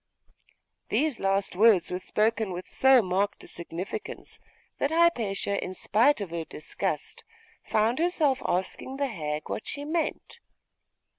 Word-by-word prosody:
These 300 -5 +1
last 195 -1 0
words 205 -3 +5
were 180 - -2
spoken 215 +1 0
with 180 +1 -6
so 265 -3 +5
marked 190 +2 -1
a - - -12
significance, 170 +2 -6 0.4
that 280 - +1
Hypatia, 230 - +1
in 185 - -5
spite 230 +7 +3
of 190 -4 -5
her 170 -1 -3
disgust, 155 - -4 0.4
found 220 +5 +1
herself 320 -6 +2
asking 190 +8 -2
the 280 - +1
hag 155 - -4
what - - -5
she 285 0 -4
meant. 335 +8 -3
215 Hz, 135 wpm, -27 LUFS, 185-270 Hz, 0.4 s, words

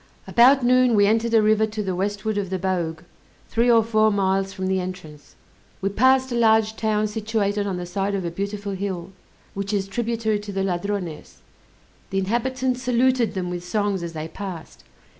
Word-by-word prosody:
About 250 +2 +5
noon 250 -1 +4
we 205 -1 +5
entered 225 +2 +1
a 220 - +5
river 215 0 +3
to 215 0 -4
the 190 -2 -2
westward 205 +3 -2
of 195 -2 -3
the 190 - -1
Bogue, 175 -4 -2 0.5
three 235 +2 +2
or 230 -1 +5
four 215 -1 +3
miles 195 -1 0
from 190 -1 -5
the 190 0 +1
entrance. 160 -6 -8 0.4
We 195 - -1
passed 260 +5 +3
a - - -1
large 220 -2 +3
town 215 -1 0
situated 210 -1 -1
on 190 -2 -2
the 180 - -5
side 195 +3 -2
of 190 -2 -3
a 170 - -2
beautiful 200 +3 -4
hill, 190 -2 -4 0.4
which 200 +1 -4
is 195 -2 -1
tributary 225 0 -1
to 205 0 -7
the 195 0 -1
Ladrones; 180 -3 -4 0.7
the 195 - -2
inhabitants 250 +5 -1
saluted 250 -2 +2
them 180 -1 -3
with 175 -1 -5
songs 205 0 -1
as 170 -1 -5
they 155 0 -5
passed. 180 -2 -8
205 Hz, 185 wpm, -23 LUFS, 190-225 Hz, 0.7 s, About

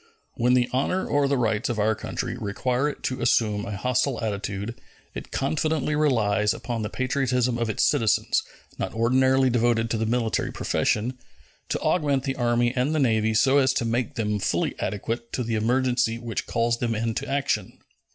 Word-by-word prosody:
When 125 +1 +2
the 125 -1 +3
honor 145 +8 0
or 145 -1 +2
the 140 0 +1
rights 110 0 0
of 120 - -2
our 110 +1 +2
country - - -4
require 125 +7 -1
it - - -9
to 130 - -2
assume 105 -3 +2
a 100 - -4
hostile 125 +3 0
attitude, 100 +1 -4 0.3
it - - -7
confidently 150 +1 0
relies 110 -8 +2
upon 120 -2 -4
the 105 - -3
patriotism 125 -2 0
of 115 -1 -1
its 110 - 0
citizens, 115 -8 +2 0.4
not - - -3
ordinarily 130 +3 +3
devoted 115 -1 +1
to 115 - +1
the 110 0 -1
military 115 -1 0
profession, 125 +4 -1 0.5
to - - -1
augment 145 -6 +1
the 135 -1 -2
Army 120 -1 +1
and 130 +5 +1
the - - +1
Navy 110 -4 +2
so 135 +5 +4
as 130 -1 +3
to 120 - -1
make 115 +2 -1
them 105 -2 -1
fully - - 0
adequate 115 +3 -3
to 125 - -1
the 115 0 -3
emergency 120 +1 +1
which 115 -2 -4
calls 115 0 0
them 115 -2 -1
into 115 +5 -2
action. 140 0 -1
120 Hz, 180 wpm, -25 LUFS, 110-130 Hz, 0.5 s, so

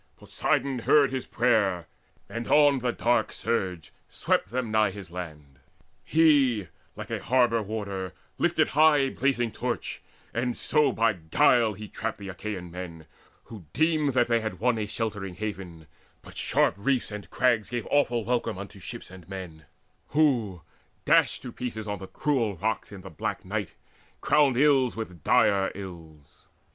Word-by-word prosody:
Poseidon 135 -2 -1
heard 140 +3 +4
his 130 -1 -4
prayer, 100 -8 +1 0.4
And 115 0 -5
on 145 -2 +5
the 125 0 0
dark 120 +1 +1
surge 90 -8 -3 0.2
swept 90 - 0
them 120 -1 -2
nigh 110 -1 +3
his 95 -2 -9
land. 75 -6 -8 0.4
He, 140 - +3 0.3
like - - -8
a - - -2
harbour 120 -2 +2
warder, 100 -3 -4 0.3
lifted - - +2
high 155 +1 +5
A 135 -1 +2
blazing 120 -4 0
torch, - - -4 0.3
and 120 +1 -1
so 150 -2 +2
by 115 -2 +2
guile 110 - +3
he 105 +2 -9
trapped 110 +2 -4
The 100 -1 -8
Achaean 95 -2 -6
men, 85 -3 -8 0.4
who 105 -7 -11
deemed 155 0 +1
that 120 -1 +3
they 115 -1 +2
had 110 0 -5
won 120 -1 +1
A 105 - -2
sheltering 105 -4 -4
haven: 95 -5 -6 0.4
but - - -13
sharp - - +2
reefs 125 +1 0
and 105 -5 -7
crags 120 -2 +1
Gave 120 -2 -3
awful 120 -6 +2
welcome 120 -5 -1
unto 100 0 -9
ships 90 - -7
and 95 -2 -13
men, 90 -5 -8 0.5
Who, 120 - +2 0.4
dashed - - +3
to 125 - -6
pieces 110 -3 -5
on 105 -1 -3
the 95 - -8
cruel 120 -8 0
rocks 110 +4 -2
In 100 -2 -9
the 95 - -10
black 80 - -4
night, 100 -3 -4 0.4
crowned 140 -5 +3
ills 135 -3 +4
with 90 -8 -7
direr 100 -1 +3
ills. 85 -6 -11
110 Hz, 160 wpm, -27 LUFS, 95-125 Hz, 0.5 s, on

